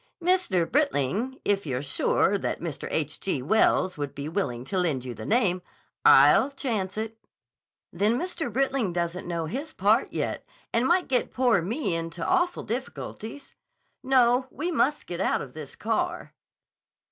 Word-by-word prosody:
"Mr. 350 - +2
Britling—if 215 - 0
you're 130 0 -2
sure 145 +7 +2
that 200 - -2
Mr. 165 -4 -5
H. 155 -1 -2
G. 145 -9 -2
Wells 185 0 +2
would 140 -1 -4
be 140 +1 -5
willing 140 -9 -2
to 190 +3 -1
lend 150 -8 0
you 125 - -5
the - - -8
name—" 200 -6 +2 0.4
"I'll 270 - +7
chance 220 -9 -3
it." 220 0 -4 0.7
"Then 210 +6 +2
Mr. 335 -6 -3
Britling 265 -5 0
doesn't 175 +1 -2
know 170 -2 -2
his 280 - -5
part 210 +6 +2
yet - - -3 0.3
and 235 +3 +2
might 355 +1 +3
get 255 -2 +1
poor 245 -7 +3
me 205 - -2
into 165 0 -4
awful 355 -1 +1
difficulties. 240 +1 -6 0.5
No, 255 -1 +3
we 330 +7 -3
must 295 -2 +1
get 175 +1 -4
out - - +1
of 125 - -8
this 150 -3 -9
car." 345 +11 -2
210 Hz, 155 wpm, -26 LUFS, 170-265 Hz, 0.7 s, I'll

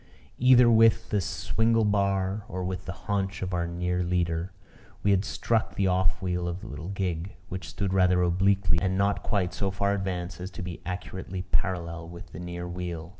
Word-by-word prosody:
Either 125 -1 +7
with 115 -1 +5
the 105 - +2
swingle 110 +5 +1
bar, 100 0 +1
or 95 -1 -3
with 95 0 -3
the 95 - -4
haunch 95 -2 -1
of 95 0 -3
our 85 -1 0
near 90 +1 -1
leader, 85 0 0 0.5
we 100 - +4
had 95 -1 +3
struck 110 +2 0
the 100 - +1
off 95 0 +1
wheel 90 -1 -1
of 90 +1 -4
the - - -8
little 75 +5 -7
gig, 95 -2 -3
which 95 -3 -5
stood 95 -1 -2
rather 90 -1 +4
obliquely 95 0 +3
and 95 0 +1
not 100 +1 +2
quite 95 -5 0
so 100 - -1
far 100 +1 0
advanced 90 -2 -3
as 90 +1 -5
to 95 - -7
be 90 -1 -6
accurately 90 0 -5
parallel 85 -3 -1
with 85 0 -10
the 80 - -8
near 90 0 -5
wheel. 85 -2 -5
95 Hz, 190 wpm, -28 LUFS, 90-100 Hz, 0.5 s, Either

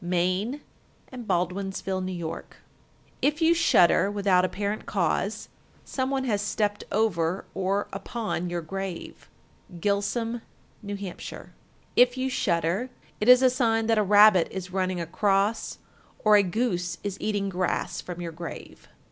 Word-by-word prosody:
Maine 185 +10 0 0.5
and 245 -4 -8
Baldwinsville, 190 +1 -1
N.Y. 185 -2 -4
1371. 160 - -4 0.8
If 300 +2 +1
you 330 0 +5
shudder 195 - +4
without 200 -3 +2
apparent 200 +3 -2
cause, - - -1 0.4
some 260 -1 -2
one 270 -1 0
has 210 -6 0
stepped 205 0 -1
over 185 -5 0
or 195 +2 -1
upon 195 -3 -3
your 175 0 -2
grave. 190 +1 -6 0.5
Gilsum, 215 +5 -1 0.4
N.H. 200 0 -5
1372. 185 -3 -8 0.4
If 245 +1 +5
you 260 0 -1
shudder, 175 +3 0 0.3
it 210 - +1
is 250 +1 +8
a 255 - +5
sign 225 -3 +1
that 225 -1 +3
a - - +3
rabbit 205 -2 +6
is 185 -1 -6
running 185 -1 0
across, 195 +5 0 0.5
or 215 -1 +6
a 205 - +7
goose 180 -3 -1
is 200 -2 -3
eating 205 -2 -1
grass 180 -1 -2
from 175 -1 -7
your 170 -1 -4
grave. 165 +1 -9
200 Hz, 140 wpm, -26 LUFS, 180-225 Hz, 0.8 s, is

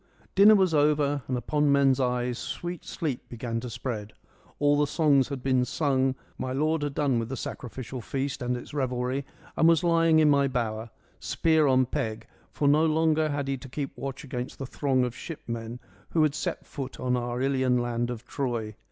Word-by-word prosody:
Dinner 205 +2 +8
was 190 -4 +3
over 145 -1 +2
and 130 - -1
upon 150 +3 +1
men's 140 -1 +4
eyes 125 -1 0
sweet 175 -1 -5
sleep 145 -7 -4
began 115 -1 -3
to 125 +1 -6
spread. 115 -3 -5 0.4
All 145 0 +3
the 150 - +3
songs 140 -4 +3
had 140 -3 -6
been 130 -2 +2
sung: 135 0 +1 0.2
my 130 - -2
lord 155 +3 +1
had 145 -1 -3
done 140 -5 +2
with 115 0 -3
the 135 - -4
sacrificial 125 +1 -6
feast 135 +2 -3
and 125 0 -1
its 120 - -10
revelry 130 -1 -1 0.3
and 165 - +4
was 165 +1 +4
lying 165 -2 +4
in 155 -1 +5
my 140 -1 +4
bower, 115 -3 -2 0.3
spear 160 -2 +2
on 130 -1 +4
peg, 120 -5 -3 0.2
for 145 - -1
no 150 +2 +5
longer 160 -1 +2
had 145 -1 -2
he 135 0 -1
to 130 +1 -11
keep 140 +1 -4
watch 135 -1 -6
against 125 -3 -5
the 135 - -5
throng 130 -1 0
of 125 0 -2
shipmen 115 -7 -6 0.3
who 160 - +2
had 150 -2 +2
set 155 - -3
foot 135 -3 -7
on 125 0 0
our 120 0 -2
Ilian 130 -1 +2
land 120 0 -1
of 120 -1 -6
Troy. 120 -5 -3
135 Hz, 195 wpm, -27 LUFS, 125-150 Hz, 0.4 s, Dinner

